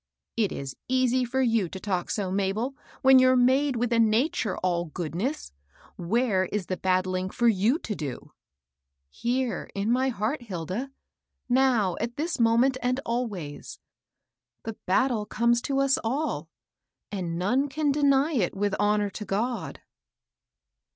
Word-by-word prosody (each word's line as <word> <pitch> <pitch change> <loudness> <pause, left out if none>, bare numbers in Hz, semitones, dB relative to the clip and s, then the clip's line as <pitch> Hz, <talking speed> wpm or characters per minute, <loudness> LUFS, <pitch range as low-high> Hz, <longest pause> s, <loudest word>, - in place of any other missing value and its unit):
" - - -64
it 220 -5 +1
is 135 -1 -5
easy 255 0 +2
for 260 +2 0
you 225 -7 +1
to 190 - -7
talk 185 -3 -2
so, 195 -4 -2
Mabel, 200 +7 -1 0.3
when 265 0 +8
you're 255 0 +5
made 260 +2 +3
with 240 0 0
a 230 - +3
nature 225 - +1
all 175 -1 +1
goodness. 175 - -4 0.4
Where 195 +1 +1
is 200 +1 -3
the 185 +1 -3
battling 185 0 0
for 240 +4 +1
you 220 +5 +3
to 230 - -5
do? 145 -9 -6 0.3
" 65 +1 -62
" 70 +1 -49
Here^ 250 +1 -2
in 200 +3 0
my 260 +2 +2
heart, 240 +5 -2
Hilda; 195 - -4 0.6
now, 245 -8 +2
at 235 +1 -3
this 320 0 -2
mo 230 0 +4
ment, 255 +1 +3
and 250 +1 0
always. 210 -11 -4 0.9
The 225 - -4
battle 220 +1 +1
comes 235 +2 +2
to 275 +1 -2
us 275 0 +3
all, 275 +8 -2 0.6
and 175 -4 -3
none 250 +11 +1
can 295 0 0
fly 285 +1 +3
it 205 -10 0
with 205 0 0
honor 205 0 +2
to 210 - -6
God." 225 +5 -3
230 Hz, 155 wpm, -26 LUFS, 185-255 Hz, 0.9 s, when